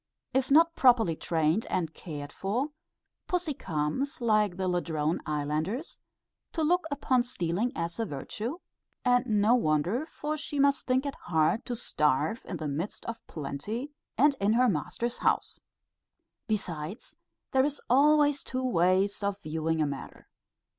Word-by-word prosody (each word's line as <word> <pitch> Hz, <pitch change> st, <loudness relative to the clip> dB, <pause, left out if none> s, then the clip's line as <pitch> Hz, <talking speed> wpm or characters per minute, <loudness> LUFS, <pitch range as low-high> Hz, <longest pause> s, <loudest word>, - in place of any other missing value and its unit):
If 265 Hz, 0 st, +1 dB
not 330 Hz, +4 st, +6 dB
properly 235 Hz, -10 st, +4 dB
trained 160 Hz, +6 st, 0 dB
and 165 Hz, -3 st, -1 dB
cared 145 Hz, -4 st, -7 dB
for, 235 Hz, +10 st, -1 dB, 0.6 s
pussy 355 Hz, -4 st, 0 dB
comes 160 Hz, -, -2 dB
like 215 Hz, -6 st, +2 dB
the 190 Hz, -1 st, -1 dB
Ladrone 165 Hz, -3 st, 0 dB
islanders 155 Hz, -, -2 dB, 0.5 s
to 325 Hz, -, 0 dB
look 355 Hz, +3 st, +2 dB
upon 270 Hz, -3 st, +2 dB
stealing 225 Hz, -2 st, -1 dB
as 170 Hz, +5 st, -3 dB
a 225 Hz, -, +1 dB
virtue; 215 Hz, -, -5 dB, 0.5 s
and 245 Hz, 0 st, +3 dB
no 215 Hz, +1 st, +4 dB
wonder, 200 Hz, -, +1 dB
for 305 Hz, -1 st, -4 dB
she 295 Hz, -1 st, -5 dB
must 280 Hz, 0 st, +3 dB
think 260 Hz, +2 st, +2 dB
it 280 Hz, -, -2 dB
hard 160 Hz, +5 st, +2 dB
to 245 Hz, -, -2 dB
starve 155 Hz, -, +1 dB
in 175 Hz, -, -4 dB
the 155 Hz, -1 st, -4 dB
midst 155 Hz, +8 st, -4 dB
of 230 Hz, 0 st, -5 dB
plenty, 205 Hz, -, -5 dB, 0.3 s
and 285 Hz, +1 st, +5 dB
in 205 Hz, +2 st, +3 dB
her 250 Hz, +2 st, +4 dB
master's 235 Hz, +6 st, -2 dB
house. -, -, 0 dB, 0.9 s
Besides, 185 Hz, -3 st, -4 dB, 0.4 s
there 265 Hz, -1 st, +4 dB
is 290 Hz, 0 st, -1 dB
always 290 Hz, +2 st, +4 dB
two 255 Hz, 0 st, -3 dB
ways 190 Hz, 0 st, +2 dB
of 200 Hz, 0 st, -1 dB
viewing 160 Hz, 0 st, 0 dB
a -, -, +1 dB
matter. 140 Hz, -2 st, -7 dB
215 Hz, 145 wpm, -29 LUFS, 160-260 Hz, 0.9 s, not